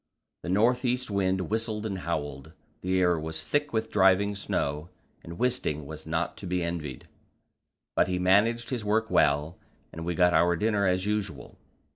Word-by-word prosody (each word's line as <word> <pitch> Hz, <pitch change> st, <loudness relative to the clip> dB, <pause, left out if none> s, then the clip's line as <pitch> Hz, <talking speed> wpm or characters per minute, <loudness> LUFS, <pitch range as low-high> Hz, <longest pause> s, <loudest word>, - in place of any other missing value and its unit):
The -, -, -6 dB
north 115 Hz, +7 st, +3 dB
east 125 Hz, -1 st, 0 dB
wind 95 Hz, -1 st, +1 dB
whistled 110 Hz, -1 st, -1 dB
and 100 Hz, -3 st, -3 dB
howled, 75 Hz, -3 st, -4 dB, 0.3 s
the 95 Hz, 0 st, +1 dB
air 90 Hz, -2 st, +3 dB
was 80 Hz, 0 st, -4 dB
thick 145 Hz, 0 st, 0 dB
with 110 Hz, 0 st, -2 dB
driving 95 Hz, +1 st, +4 dB
snow, 75 Hz, -5 st, -2 dB, 0.3 s
and 85 Hz, +1 st, -9 dB
Wisting 120 Hz, -, 0 dB
was 80 Hz, +1 st, -9 dB
not 80 Hz, +2 st, -1 dB
to 95 Hz, -, -7 dB
be 90 Hz, 0 st, -1 dB
envied. 80 Hz, -6 st, -5 dB, 0.9 s
But -, -, +3 dB
he 90 Hz, -1 st, -1 dB
managed 110 Hz, +7 st, +2 dB
his 120 Hz, -4 st, -2 dB
work 110 Hz, +2 st, 0 dB
well, 75 Hz, +3 st, +2 dB, 0.3 s
and 80 Hz, -, -6 dB
we 85 Hz, +1 st, -2 dB
got 90 Hz, 0 st, +4 dB
our 85 Hz, 0 st, +4 dB
dinner 105 Hz, +1 st, +1 dB
as 90 Hz, +1 st, +1 dB
usual. 105 Hz, -1 st, -3 dB
95 Hz, 170 wpm, -28 LUFS, 80-110 Hz, 0.9 s, driving